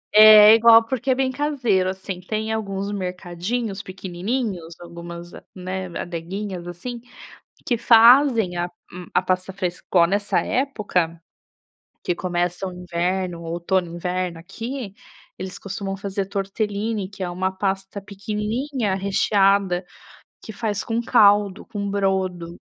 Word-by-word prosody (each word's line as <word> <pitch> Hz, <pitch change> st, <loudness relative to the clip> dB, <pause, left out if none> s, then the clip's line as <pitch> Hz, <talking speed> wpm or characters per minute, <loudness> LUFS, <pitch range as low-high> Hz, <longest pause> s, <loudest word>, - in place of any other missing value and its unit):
É, 215 Hz, 0 st, +10 dB
é -, -, +9 dB
igual, 230 Hz, 0 st, +7 dB
porque 260 Hz, +2 st, -3 dB
é 255 Hz, -, +4 dB
bem 260 Hz, 0 st, 0 dB
caseiro, 250 Hz, -10 st, 0 dB
assim, 190 Hz, -1 st, -5 dB
tem 215 Hz, +3 st, -3 dB
alguns 200 Hz, -2 st, -3 dB
mercadinhos 190 Hz, +3 st, -4 dB
pequenininhos, 185 Hz, -1 st, -4 dB
algumas, 170 Hz, 0 st, -9 dB, 0.2 s
né, 185 Hz, 0 st, -4 dB
adeguinhas, 175 Hz, +2 st, -5 dB
assim, 230 Hz, +8 st, -7 dB, 0.6 s
que 240 Hz, -, +1 dB
fazem 230 Hz, -4 st, +6 dB
a 175 Hz, -, 0 dB, 0.3 s
um 180 Hz, 0 st, -8 dB
a -, -, +3 dB
pasta 185 Hz, +1 st, -1 dB
frescor 180 Hz, -2 st, +1 dB
nessa 200 Hz, +2 st, +1 dB
época, 205 Hz, -11 st, -1 dB, 0.8 s
que 175 Hz, -, 0 dB
começa 175 Hz, +1 st, -2 dB
o 185 Hz, -, -5 dB
inverno 180 Hz, 0 st, -2 dB
o -, -, -10 dB
outono 170 Hz, +1 st, -1 dB
inverno 180 Hz, -1 st, -3 dB
aqui, 230 Hz, +4 st, -6 dB, 0.4 s
eles 185 Hz, 0 st, -6 dB
costumam 195 Hz, 0 st, -5 dB
fazer 195 Hz, 0 st, -3 dB
tortelline, 205 Hz, +1 st, -2 dB
que 200 Hz, -1 st, -9 dB
é 180 Hz, -, -1 dB
uma 185 Hz, +2 st, -1 dB
pasta 195 Hz, +1 st, -3 dB
pequenininha 210 Hz, +4 st, -3 dB
recheada, 195 Hz, -1 st, +2 dB, 0.6 s
que 220 Hz, -, -8 dB
faz 210 Hz, -1 st, -3 dB
com 230 Hz, 0 st, -1 dB
caldo, 205 Hz, -4 st, +4 dB
com 205 Hz, -3 st, -4 dB
brodo. 190 Hz, -4 st, -1 dB
195 Hz, 130 wpm, -22 LUFS, 180-215 Hz, 0.8 s, É